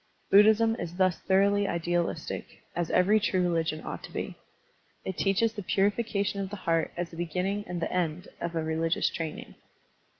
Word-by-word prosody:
Buddhism 220 +3 +6
is 170 0 -5
thus 185 -2 +2
thoroughly 200 +1 +3
idealistic, 170 -2 -2
as 175 -1 -1
every 205 +4 +4
true 185 -3 +1
religion 165 -3 0
ought - - -5
to - - -13
be. - - -4 0.7
It 190 - -3
teaches 200 +4 +2
the 210 - -5
purification 200 +1 0
of 195 - -3
the 205 - -5
heart 165 -4 0
as 175 -1 -3
the 165 - -10
beginning 180 +5 -2
and 180 0 -3
the 165 - -2
end 180 +1 -1
of 170 0 -3
all 165 - 0
religious 160 +1 0
training. 160 -2 -5
180 Hz, 170 wpm, -28 LUFS, 170-200 Hz, 0.7 s, Buddhism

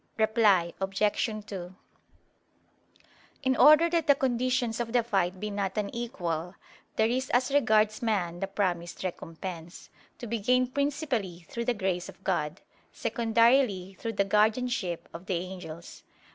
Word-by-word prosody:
Reply 215 -6 +3
Obj. 195 +2 -2 0.4
2: 185 -4 -7 1.7
In 260 -1 +2
order 305 +6 +7
that 335 -2 +1
the 285 - +6
conditions 250 -2 0
of 235 -1 -3
the 245 -1 +3
fight 190 -5 0
be 210 +1 -4
not 200 0 -2
unequal, 195 -6 -3 0.4
there 220 - +3
is 255 +3 -1
as 255 +3 +2
regards 215 -5 +3
man 185 -7 -1
the 195 - -2
promised 180 -4 -2
recompense, 170 -1 -7 0.3
to - - -7
be 230 0 -2
gained 250 +4 +2
principally 265 - -2
through 235 0 -4
the 245 0 +1
grace 190 -3 -2
of - - -14
God, 160 -2 -1 0.3
secondarily 230 -4 +2
through 230 -1 -3
the 200 -1 +1
guardianship 215 -3 +1
of 170 +3 -9
the 190 - 0
angels. 175 -2 -7
210 Hz, 140 wpm, -28 LUFS, 185-240 Hz, 1.7 s, order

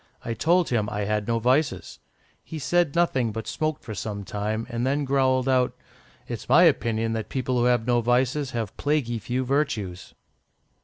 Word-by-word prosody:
I 115 - -2
told 170 +7 +2
him 110 -4 0
I 105 - -3
had 105 0 -1
no 115 0 +1
vices. 125 - 0 0.4
He 160 - -7
said 170 0 +1
nothing, 135 -9 +2
but 110 +1 -5
smoked 155 -2 -2
for 110 - -6
some 100 0 -5
time, 105 +3 -3
and 120 -1 -3
then 140 +3 0
growled 130 -1 +2
out, 130 -1 +2 0.5
'It's 120 -1 -6
my 155 +7 +7
opinion 115 -8 +2
that 110 -1 -4
people 130 -1 -1
who 120 - +2
have 120 -2 +2
no 120 -1 +2
vices 125 +4 +1
have 115 -5 -4
plaguy 145 -6 0
few 125 +4 -2
virtues. 120 -10 -2
125 Hz, 175 wpm, -25 LUFS, 110-140 Hz, 0.5 s, my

